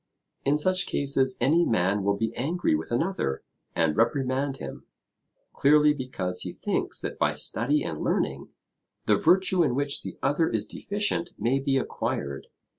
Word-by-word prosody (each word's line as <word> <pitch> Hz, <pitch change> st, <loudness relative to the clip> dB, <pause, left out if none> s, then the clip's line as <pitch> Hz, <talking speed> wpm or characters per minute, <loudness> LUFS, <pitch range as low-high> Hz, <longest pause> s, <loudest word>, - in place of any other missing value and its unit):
In 140 Hz, +2 st, +2 dB
such 185 Hz, +4 st, +2 dB
cases 135 Hz, -2 st, +1 dB
any 155 Hz, +8 st, +3 dB
man 100 Hz, -, +1 dB
will 100 Hz, 0 st, +1 dB
be 115 Hz, +2 st, -2 dB
angry 165 Hz, -, 0 dB
with 80 Hz, +6 st, -2 dB
another, 120 Hz, -, -1 dB, 0.3 s
and 80 Hz, -2 st, +1 dB
reprimand 135 Hz, +3 st, 0 dB
him, -, -, -9 dB, 0.7 s
clearly 150 Hz, +1 st, +4 dB
because 100 Hz, -10 st, -3 dB
he -, -, -4 dB
thinks -, -, -1 dB
that -, -, -5 dB
by -, -, +2 dB
study 145 Hz, +7 st, +1 dB
and 75 Hz, -, -5 dB
learning, -, -, -1 dB, 0.6 s
the 105 Hz, -, +4 dB
virtue 185 Hz, -, +3 dB
in 135 Hz, -6 st, 0 dB
which 140 Hz, +1 st, +1 dB
the -, -, -8 dB
other 150 Hz, +4 st, +2 dB
is 110 Hz, -2 st, -1 dB
deficient 200 Hz, -, -2 dB
may 130 Hz, +4 st, +1 dB
be 135 Hz, 0 st, 0 dB
acquired. 70 Hz, -, -3 dB
135 Hz, 155 wpm, -26 LUFS, 110-150 Hz, 0.7 s, clearly